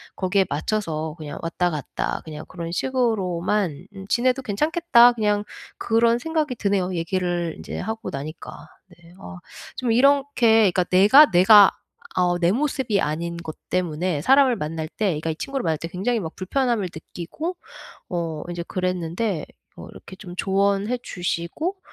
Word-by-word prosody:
거기에 190 +1 +1
맞춰서 160 -1 -2
그냥 150 -2 -7
왔다 175 +2 0
갔다 150 -5 -4
그냥 155 -1 -8
그런 170 -2 -7
식으로만 190 - -1
음 195 0 -9
지내도 255 +2 +2
괜찮겠다.' 260 - +4
그냥 210 -3 0 0.3
그런 230 +1 +2
생각이 310 -1 -2
드네요 195 -4 -1
얘기를 175 0 -2
인제 - - -8
하고 220 +3 -4
나니까. 150 +4 -8 0.4
네. 165 +1 -17
어 190 - -10 0.4
좀 250 - -2
이렇게 245 -5 +4
그러니까 180 0 +1
내가 210 +11 +7
내가 195 +3 +7 0.5
어 175 -1 +2
내 175 0 +3
모습이 255 -4 0
아닌 170 +3 -3
것 160 -2 -7
때문에 175 -2 -1
사람을 265 - +4
만날 155 -1 -4
때 215 - -3
그러니까 155 +1 -3
이 160 - -2
친구를 275 +7 -4
만날 160 -2 0
때 165 - -6
굉장히 205 +7 -1
막 165 -5 -6
불편함을 230 0 -1
느끼고 180 - -6 0.5
어 165 -4 -3
이제 170 0 -4
그랬는데 180 0 -2 0.3
어 - - -9
이렇게 - - -12
좀 180 -3 -10
조언해 200 +5 +1
주시고 180 - -3
190 Hz, 325 characters per minute, -23 LUFS, 170-235 Hz, 0.5 s, 내가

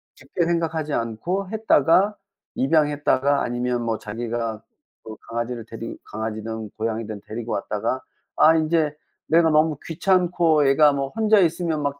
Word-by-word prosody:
깊게 145 +5 -3
생각하지 165 -3 -1
않고 170 - -2
했다가 205 -2 +3 0.4
입양했다가 145 -1 +2
아니면 120 0 -1
뭐 115 -1 -1
자기가 115 +1 -4
뭐 105 - -12 0.5
그 110 - -7
강아지를 115 0 -4
데리 115 0 -7
강아지든 110 0 -5
고양이든 110 -2 -3
데리고 115 +1 -6
왔다가 110 +5 -2 0.4
아 160 +1 +6
인제 155 -1 +1 0.3
내가 165 0 +4
너무 155 -1 +3
귀찮고, 170 -3 +2
얘가 145 +1 +5
뭐 135 -1 -2
혼자 220 +2 +2
있으면 170 -3 0
막 140 0 -2
140 Hz, 320 characters per minute, -23 LUFS, 115-165 Hz, 0.5 s, 아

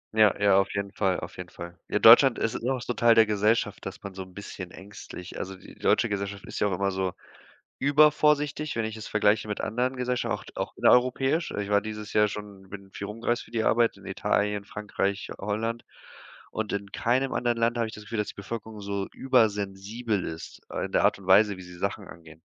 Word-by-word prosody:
Ja, 105 -3 +5
ja, 100 -1 +5
auf 95 - 0
jeden 100 0 -2
Fall, 95 -3 0
auf - - -8
jeden - - -7
Fall. 85 0 -9
Ja, - - +1
Deutschland 120 +3 +8
ist 115 - -1
immer 130 +3 -1
noch 125 - -6
so 125 - -2
'n - - -20
Teil 115 -1 +5
der 115 - +7
Gesellschaft, 105 +1 +1
dass 95 -1 -8
man 100 -1 -7
so 95 - -7
'n 95 -1 -11
bisschen 95 -3 -7
ängstlich 95 -1 -10
also, 95 +1 -5
die - - -14
deutsche - - +2
Gesellschaft 100 -1 -4
ist - - -6
ja - - +2
auch 95 - -1
immer 100 +2 0
so 95 -1 -2 0.7
übervorsichtig, 150 0 +3
wenn 115 - 0
ich 110 0 -4
es 110 - -8
vergleiche 105 0 +2
mit 105 - -3
anderen 125 +4 -1
Gesellschaf 125 -1 -1
auch - - -3
auch - - -4
innereuropäisch. 135 +6 +3
Ich 100 0 -3
war 100 0 +4
dieses 105 0 -7
Jahr 105 0 +4
schon 100 -2 -9
bin 100 -1 -10
viel 100 - -6
rum 105 +2 -8
gereist 120 0 0
für - - -17
die 115 -1 -1
Arbeit 115 0 +3
in - - -15
Italien, 105 0 0
Frankreich, 100 -1 -3
Holland. 110 +3 -2 0.7
Und 110 -1 -3
in 100 -1 -4
keinem 130 +3 +1
anderen 120 -1 0
Land 115 +1 +1
habe 115 -1 0
ich - - -10
das 105 - -10
Gefühl, 110 +2 -5
dass 105 - -1
die - - -7
Bevölkerung 110 +1 -7
so 100 -1 -3
übersensibel 105 -3 0
ist, 80 0 -7
äh, - - -2
in - - -13
der - - +3
Art - - +3
und 100 - -14
Weise, 100 +1 +5
wie 95 - -10
sie 90 0 -12
Sachen - - -3
angehen. 80 -1 -13
105 Hz, 225 wpm, -27 LUFS, 100-115 Hz, 0.7 s, Deutschland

